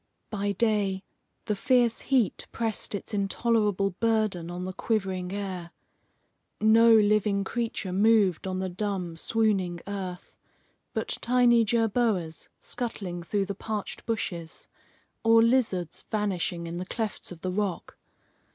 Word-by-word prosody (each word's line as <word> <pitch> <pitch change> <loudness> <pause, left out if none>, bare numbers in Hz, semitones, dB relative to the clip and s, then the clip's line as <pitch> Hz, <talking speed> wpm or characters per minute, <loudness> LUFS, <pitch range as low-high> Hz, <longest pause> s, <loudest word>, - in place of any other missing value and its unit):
By 205 -1 -1
day, 200 -3 +1 0.4
the 210 - 0
fierce 240 +1 +2
heat 250 -8 +1
pressed 225 -2 -2
its 200 - -6
intolerable 205 -1 +1
burden 215 -4 0
on 175 +1 -5
the 185 - -4
quivering 190 -4 -1
air. 190 -4 -4 0.9
No 225 +2 +6
living 210 -1 +3
creature 220 -3 -3
moved 200 -3 +3
on 185 0 -2
the 190 0 -1
dumb, 185 -2 -3
swooning 190 -2 +1
earth, 190 -3 -6 0.6
but - - -2
tiny 240 -1 +4
jerboas 220 -6 0
scuttling 195 -7 -4
through 195 +4 -1
the 200 - -3
parched 210 +1 -5
bushes, 175 -7 -3 0.6
or 225 0 +6
lizards 225 -8 +1
vanishing 185 -5 -1
in 170 +1 -5
the 180 - -4
clefts 220 0 -4
of 170 -2 -10
the 185 - -2
rock. 195 -2 -2
200 Hz, 125 wpm, -27 LUFS, 185-225 Hz, 0.9 s, No